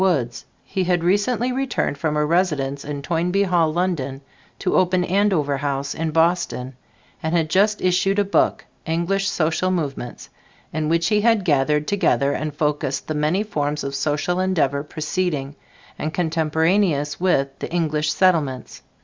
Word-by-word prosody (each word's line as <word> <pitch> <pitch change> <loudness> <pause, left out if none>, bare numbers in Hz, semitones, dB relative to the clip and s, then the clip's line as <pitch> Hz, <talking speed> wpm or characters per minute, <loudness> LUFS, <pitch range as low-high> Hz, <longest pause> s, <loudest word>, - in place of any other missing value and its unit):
Woods. 140 -11 0 0.2
He 190 -1 -2
had 175 -1 +1
recently 215 +7 +1
returned 260 - -1
from 150 +1 -1
a 150 - +2
residence 150 -5 0
in 145 -1 -5
Toynbee 175 +5 +1
Hall, 175 -4 +2
London, 155 -6 -2 0.4
to 185 - -1
open 185 0 +3
Andover 180 -7 +1
House 140 -1 -2
in 160 0 -2
Boston, 160 -5 0 0.5
and 160 +2 -1
had 160 -2 +1
just 210 +4 +2
issued 185 +2 +2
a 205 - +4
book, 200 - +1 0.2
"English 175 +4 0
Social 165 +3 0
Movements," 145 -9 -3 0.5
in 155 -1 -1
which 170 +1 +2
he 210 -1 +3
had 225 -3 +3
gathered 150 0 +2
together 170 -8 +2
and 155 +1 -3
focused 150 -2 -1
the 155 - -2
many 155 +7 +1
forms 150 -7 -2
of 140 0 -4
social 150 +6 -1
endeavor 160 -7 +1
preceding 150 -2 -3 0.4
and 155 - -2
contemporaneous 160 -1 +1
with 170 -7 +2
the - - -5
English 155 -3 0
Settlements. 150 -10 +1
160 Hz, 150 wpm, -22 LUFS, 145-185 Hz, 0.5 s, a